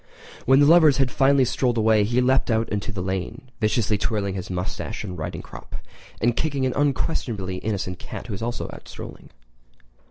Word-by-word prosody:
When 135 +2 +6
the 145 - +6
lovers 155 -3 +6
had 135 -2 +2
finally 135 -1 +4
strolled 125 0 0
away 110 -1 +4
he 120 +4 +1
leapt 130 +1 +2
out 115 0 +1
into 105 +2 -2
the 95 -4 -4
lane, 95 +7 -4
viciously 110 -1 +1
twirling 100 -3 -1
his 95 -1 -5
moustache 95 +4 -4
and 95 -3 -6
riding 80 -2 -5
crop, - - -11 0.4
and 120 +1 +2
kicking 140 -4 0
an 130 - 0
unquestionably 120 - -1
innocent 95 -3 -3
cat - - -8
who 115 - -6
was 95 - -5
also 120 +1 -3
out - - -11
strolling. - - -10
115 Hz, 185 wpm, -24 LUFS, 100-130 Hz, 0.4 s, When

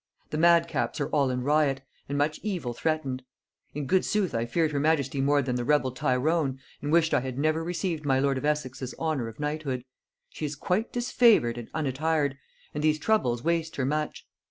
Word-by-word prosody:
The 150 - -2
madcaps 170 -1 +3
are 145 - -1
all 140 -3 +2
in 125 0 -2
riot, 145 -1 +2 0.3
and 140 - -1
much 150 +2 0
evil 180 - -3
threatened. 140 -2 -1 0.5
In 145 -1 -3
good 185 +7 +3
sooth 205 -5 0
I 115 +1 -1
feared 160 +4 +1
her 145 - -1
majesty 140 -3 +1
more 140 +1 +3
than 125 -1 -1
the 120 - -2
rebel 145 -1 +2
Tyrone, 135 +3 0 0.2
and 145 - -2
wished 165 -1 +3
I - - +4
had 130 0 -5
never 155 +3 +1
received 170 -2 -2
my 135 -2 +2
lord 135 -1 +1
of - - -10
Essex's 135 -4 -2
honor 155 -7 -1
of 115 +3 -10
knighthood. 150 -4 -3 0.5
She - - -8
is 150 0 -2
quite 185 - -1
disfavored 235 - +3
and 120 - -9
unattired, 150 0 0 0.4
and 150 - -3
these 155 0 +3
troubles 135 - +1
waste 165 -1 0
her 135 - -1
much. 150 +2 -2
150 Hz, 195 wpm, -27 LUFS, 130-160 Hz, 0.5 s, I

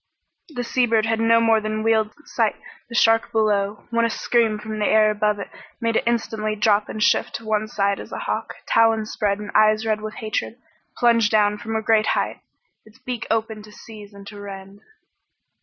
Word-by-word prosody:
The 245 -6 -4
sea 245 +1 +1
bird 220 -1 +2
had 225 0 0
no 230 0 +4
more 225 -1 +3
than 215 0 -3
wheeled 220 -1 +1
to 295 - -24
sight - - 0 0.3
the 235 - -7
shark 225 -1 +3
below, 210 -2 0
when 230 0 +1
a 230 - +2
scream 225 -2 +1
from 215 0 -6
the 210 - +1
air 215 0 +4
above 210 0 0
it 200 - -8 0.3
made 230 -1 -1
it - - +2
instantly 220 -2 -1
drop 210 -1 +2
and 215 - -2
shift - - +1
to 230 - -7
one 215 0 0
side 200 -1 0
as - - -10
a - - -5
hawk, - - -4
talons 225 -1 +2
spread 200 -1 0
and 210 0 -8
eyes 215 +1 +4
red 215 -1 0
with 215 0 -6
hatred, 220 +1 -3 0.4
plunged 230 -3 +3
down 210 -1 +2
from 225 -1 -5
a 220 - -1
great 220 0 +3
height, - - -1 0.4
its 215 0 -20
beak 245 -3 -6
open 220 -1 -1
to 210 0 -14
seize 210 -1 -12
and 200 -1 -13
to 205 0 -10
rend. 195 0 -10
215 Hz, 205 wpm, -22 LUFS, 210-225 Hz, 0.4 s, no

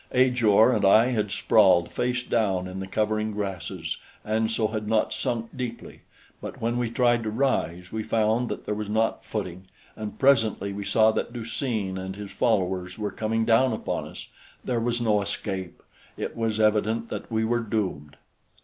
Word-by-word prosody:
Ajor 125 -3 +5
and - - 0
I 110 +5 +6
had 105 -4 0
sprawled 95 -5 +4
face 125 0 -1
down 95 -7 0
in 95 +1 -6
the 95 - -5
covering 110 +1 -1
grasses 100 -4 -4 0.3
and 110 +1 +1
so 110 -1 0
had 110 -1 -4
not 110 0 +1
sunk 115 -3 -3
deeply; 125 -2 -6 0.4
but - - -7
when 120 +2 -1
we 120 -2 0
tried 120 0 +2
to 110 - -3
rise, 105 -8 -1
we 110 - -2
found 110 +2 +1
that - - -5
there - - -1
was 105 0 -4
not 110 +1 0
footing, 95 -3 -5 0.3
and 110 -1 -6
presently 110 -7 +3
we 100 0 -5
saw 110 +1 +4
that 115 - -3
Du 120 -2 -5
seen 110 -5 -2
and 95 0 -5
his 100 -1 -8
followers 95 -5 0
were 105 -1 -3
coming 115 +1 -1
down 115 +2 +4
upon 110 - -3
us. - - -10 0.4
There 125 -2 0
was 120 +1 -1
no 105 -3 +2
escape. 95 -2 -5 0.3
It - - -4
was 115 -1 -1
evident 110 +1 +2
that - - -6
we 110 0 +1
were 120 +1 +1
doomed. 100 -11 -3
110 Hz, 180 wpm, -26 LUFS, 100-115 Hz, 0.4 s, I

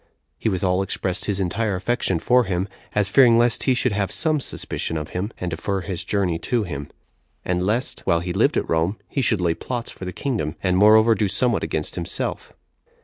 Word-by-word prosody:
He 110 - 0
withal 95 -1 +1
expressed 95 -1 -2
his 100 -2 -1
entire 100 +3 -1
affection 95 -2 0
for 125 +8 +3
him, 95 0 -1 0.3
as 105 -2 +3
fearing 120 +2 +6
lest 120 -1 +2
he 130 - +3
should 125 - +2
have 100 -1 -1
some 155 -2 +1
suspicion 80 - -3
of 75 -1 -5
him, 95 +5 -3
and 90 -1 -3
defer 95 +4 -2
his 85 0 -4
journey 95 -5 0
to 120 +1 0
him; 70 -7 -6 0.6
and 90 0 0
lest, 110 +7 -1
while 85 0 +1
he 90 0 -3
lived 115 - +2
at - - -1
Rome, 85 +6 0
he 140 - -2
should 110 -6 +2
lay 85 -2 +2
plots 120 +6 -5
for 95 - -8
the 90 - -4
kingdom, 95 - -2
and, 90 -1 +2
moreover, 110 +3 +6
do 105 -1 0
somewhat 115 +4 +1
against 80 -1 -2
himself. 85 -1 -3
100 Hz, 205 wpm, -22 LUFS, 90-115 Hz, 0.6 s, fearing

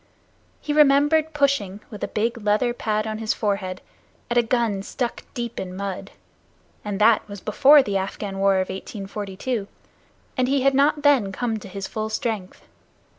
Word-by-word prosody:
He 295 - -2
remembered 300 +2 +4
pushing, 280 -10 0
with 210 - -8
a - - 0
big 230 +2 -1
leather 210 +4 +1
pad 215 -3 -1
on 215 0 -4
his 220 -1 -1
forehead, 195 -3 -2 0.5
at 240 - +2
a - - +6
gun 230 -4 0
stuck 240 +4 -3
in - - -31
deep 235 -3 -4
mud, 190 +1 -5 0.7
and 205 -1 -4
that 215 0 +4
was 200 0 -7
before 280 +8 +6
the 200 -4 -1
Afghan 195 0 -4
War 195 0 +4
of 185 0 0
1842, 200 +3 -5 0.7
and 255 -1 +1
he 275 0 +2
had 275 0 +4
not 290 +2 +3
then 265 -9 +4
come 225 +2 -2
to 205 - -10
his 195 +1 -6
full 215 0 -4
strength. 220 -5 -4
215 Hz, 170 wpm, -23 LUFS, 200-260 Hz, 0.7 s, a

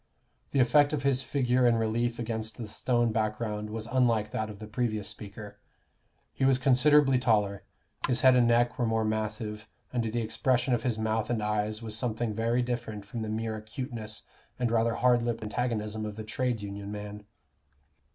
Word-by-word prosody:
The 140 - 0
effect 145 +4 +5
of 140 -3 -1
his 135 -2 +2
figure 125 -2 +2
in 120 - +4
relief 115 +1 0
against 110 -1 -3
the 115 -3 -6
stone 120 +2 +1
background 110 -1 -2
was 110 0 -4
unlike 115 -3 +1
that 110 0 -2
of 105 - -8
the 110 - -8
previous 110 -2 -2
speaker. 105 -1 -9 0.7
He - - -3
was 135 -1 +5
considerably 135 +1 +4
taller, 105 -5 +1 0.4
his 125 +3 +2
head 130 -2 +7
and 120 -1 +5
neck 120 +1 +2
were 120 - +2
more 110 0 +1
massive, 110 0 -3 0.3
and 120 - +1
the 115 +1 -1
expression 125 +3 +1
of 120 - +1
his 120 -2 0
mouth 110 0 -1
and 115 -3 0
eyes 105 +1 -1
was 110 -1 -2
something 115 -1 -1
very 115 +3 +1
different 120 -4 -4
from 115 +3 -5
the 110 - -3
mere 110 0 -2
acuteness 110 -1 -5 0.3
and 125 -2 0
rather 115 0 +2
hard 125 -1 +4
lipped 115 -1 -2
antagonism 110 -1 -2
of 105 -1 -5
the 110 - -6
trades 115 0 -2
union 100 0 -6
man. 105 0 -7
115 Hz, 180 wpm, -29 LUFS, 110-125 Hz, 0.7 s, head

